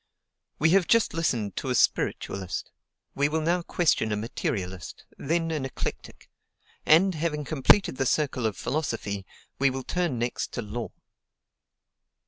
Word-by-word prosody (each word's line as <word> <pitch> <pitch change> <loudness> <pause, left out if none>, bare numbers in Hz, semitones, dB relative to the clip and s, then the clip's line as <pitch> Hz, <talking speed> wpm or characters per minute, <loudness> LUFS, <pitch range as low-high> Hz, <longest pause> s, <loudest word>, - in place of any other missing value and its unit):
We 160 +2 +3
have 190 -1 +4
just 230 -1 +3
listened 125 -11 -1
to 135 - -3
a 125 - +1
spiritualist; 95 -5 0 0.4
we 145 +1 +1
will 160 +1 0
now 175 +3 +1
question 160 -10 +1
a - - +1
materialist, 95 -4 -4
then 165 +3 -1
an 155 -4 -2
eclectic: 135 - -6 0.6
and 185 +5 +6
having 150 -2 -2
completed 155 +2 +4
the 135 - +1
circle 130 -6 +1
of 105 - -4
philosophy, 115 - -3 0.3
we 140 0 +4
will 130 0 -4
turn 175 -6 -1
next 120 +1 -2
to 120 - -3
law. 115 +3 -5
135 Hz, 140 wpm, -27 LUFS, 115-165 Hz, 0.6 s, and